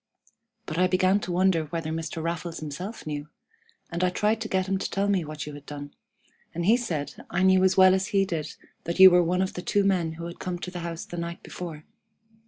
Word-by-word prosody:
But 155 Hz, +2 st, -3 dB
I 185 Hz, -, +5 dB
began 185 Hz, +2 st, +3 dB
to 180 Hz, -, -5 dB
wonder 175 Hz, -2 st, +2 dB
whether 165 Hz, 0 st, -4 dB
Mr. 160 Hz, 0 st, -4 dB
Raffles 170 Hz, 0 st, -3 dB
himself 175 Hz, +9 st, -6 dB
knew, 150 Hz, -1 st, -5 dB, 0.6 s
and 170 Hz, +1 st, -1 dB
I 180 Hz, -, +4 dB
tried 210 Hz, +4 st, 0 dB
to 220 Hz, -, -2 dB
get 190 Hz, -2 st, 0 dB
him 190 Hz, 0 st, 0 dB
to -, -, -3 dB
tell 200 Hz, +1 st, 0 dB
me 195 Hz, -4 st, +2 dB
what 155 Hz, -2 st, -6 dB
you 150 Hz, -, -7 dB
had 145 Hz, 0 st, -11 dB
done, 145 Hz, -1 st, -8 dB, 0.6 s
and 170 Hz, 0 st, -2 dB
he 220 Hz, +5 st, +6 dB
said 170 Hz, -12 st, -3 dB, 0.2 s
I 180 Hz, +2 st, 0 dB
knew 190 Hz, 0 st, +5 dB
as 190 Hz, 0 st, +3 dB
well 185 Hz, 0 st, +8 dB
as 190 Hz, 0 st, 0 dB
he 195 Hz, -1 st, +2 dB
did 160 Hz, -5 st, -4 dB, 0.3 s
that 170 Hz, +2 st, -3 dB
you 190 Hz, 0 st, +11 dB
were 180 Hz, 0 st, +6 dB
one 180 Hz, +2 st, +1 dB
of 190 Hz, -, -3 dB
the 180 Hz, -, -5 dB
two 205 Hz, +2 st, +1 dB
men 180 Hz, -5 st, +1 dB
who 170 Hz, +1 st, -7 dB
had 170 Hz, 0 st, -8 dB
come 180 Hz, -1 st, -3 dB
to 180 Hz, +1 st, -6 dB
the 180 Hz, -, -5 dB
house 170 Hz, -1 st, -5 dB
the 175 Hz, -, -8 dB
night 170 Hz, 0 st, -5 dB
before. 160 Hz, -4 st, -7 dB
175 Hz, 240 wpm, -26 LUFS, 160-190 Hz, 0.6 s, you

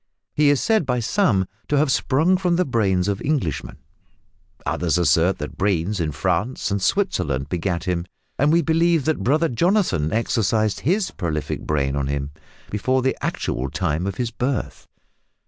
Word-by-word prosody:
He 150 Hz, -1 st, +4 dB
is 145 Hz, -2 st, +3 dB
said 220 Hz, -4 st, +2 dB
by 125 Hz, -1 st, +1 dB
some 110 Hz, -, +1 dB, 0.2 s
to 145 Hz, -, +1 dB
have 145 Hz, -1 st, +3 dB
sprung 150 Hz, +8 st, +2 dB
from 180 Hz, -2 st, +1 dB
the 180 Hz, +1 st, +2 dB
brains 100 Hz, -, +1 dB
of 100 Hz, -1 st, -1 dB
Englishmen, 135 Hz, -, -2 dB, 0.9 s
others 85 Hz, -1 st, 0 dB
assert 85 Hz, +2 st, +3 dB
that 75 Hz, -, -7 dB
brains 95 Hz, 0 st, 0 dB
in 80 Hz, -2 st, -1 dB
France 95 Hz, -, -1 dB
and 100 Hz, 0 st, -1 dB
Switzerland 75 Hz, -, 0 dB
begat 90 Hz, 0 st, -2 dB
him, 90 Hz, -1 st, -2 dB, 0.3 s
and 145 Hz, +3 st, +4 dB
we 170 Hz, +1 st, +3 dB
believe 165 Hz, -2 st, +2 dB
that 155 Hz, -8 st, 0 dB
brother 155 Hz, +8 st, +2 dB
Jonathan 160 Hz, -, +1 dB
exercised 110 Hz, -1 st, +1 dB
his 190 Hz, +7 st, 0 dB
prolific 80 Hz, -6 st, -4 dB
brain 70 Hz, -2 st, 0 dB
on 70 Hz, -1 st, -1 dB
him, 70 Hz, 0 st, -3 dB, 0.4 s
before 130 Hz, +5 st, 0 dB
the 130 Hz, -, +1 dB
actual 65 Hz, +2 st, -2 dB
time 85 Hz, +3 st, -1 dB
of 100 Hz, -, -3 dB
his 120 Hz, +2 st, -2 dB
birth. 125 Hz, +3 st, -3 dB
110 Hz, 165 wpm, -22 LUFS, -, 0.9 s, He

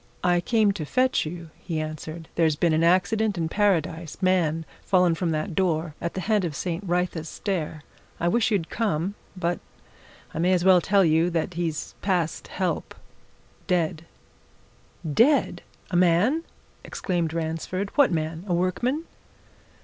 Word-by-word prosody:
"I 175 Hz, -1 st, +3 dB
came 215 Hz, +1 st, +3 dB
to 195 Hz, -5 st, -4 dB
fetch 255 Hz, -, +1 dB
you," 165 Hz, 0 st, -8 dB
he 160 Hz, -3 st, -3 dB
answered. 155 Hz, +1 st, -6 dB
"There's 160 Hz, -3 st, +2 dB
been 165 Hz, +1 st, +2 dB
an 160 Hz, +1 st, +2 dB
accident 200 Hz, +4 st, +2 dB
in 165 Hz, -1 st, 0 dB
Paradise 170 Hz, -5 st, 0 dB
man 170 Hz, -4 st, +1 dB, 0.2 s
fallen 180 Hz, -3 st, +3 dB
from 170 Hz, +1 st, -1 dB
that 160 Hz, +4 st, -2 dB
door 165 Hz, -3 st, 0 dB
at 170 Hz, -, -3 dB
the 190 Hz, -, -2 dB
head 210 Hz, +1 st, +1 dB
of 165 Hz, -4 st, -3 dB
St. 175 Hz, +5 st, -3 dB
Wrytha's 175 Hz, -3 st, -1 dB
Stair. 160 Hz, -6 st, -3 dB, 0.4 s
I 170 Hz, -, 0 dB
wish 225 Hz, +5 st, +2 dB
you'd 195 Hz, -7 st, -1 dB
come 195 Hz, -4 st, -1 dB, 0.2 s
but 175 Hz, -1 st, -1 dB, 0.7 s
I -, -, -4 dB
may 180 Hz, +3 st, +3 dB
as 180 Hz, -1 st, +1 dB
well 185 Hz, -2 st, +7 dB
tell 195 Hz, +1 st, +3 dB
you 160 Hz, +2 st, +3 dB
that 170 Hz, +1 st, -1 dB
he's 165 Hz, -2 st, -3 dB
past 180 Hz, -5 st, -1 dB
help -, -, -2 dB, 0.7 s
dead!" 170 Hz, -3 st, 0 dB, 1.0 s
"Dead! 240 Hz, -, +3 dB, 0.3 s
A -, -, -1 dB
man?" 185 Hz, -, +3 dB, 0.4 s
exclaimed 170 Hz, -4 st, -2 dB
Ransford. 165 Hz, +4 st, -3 dB
"What 285 Hz, -6 st, +5 dB
man? 160 Hz, 0 st, -2 dB
A 175 Hz, -, +1 dB
workman?" 240 Hz, -, 0 dB
175 Hz, 150 wpm, -25 LUFS, 160-190 Hz, 1.0 s, well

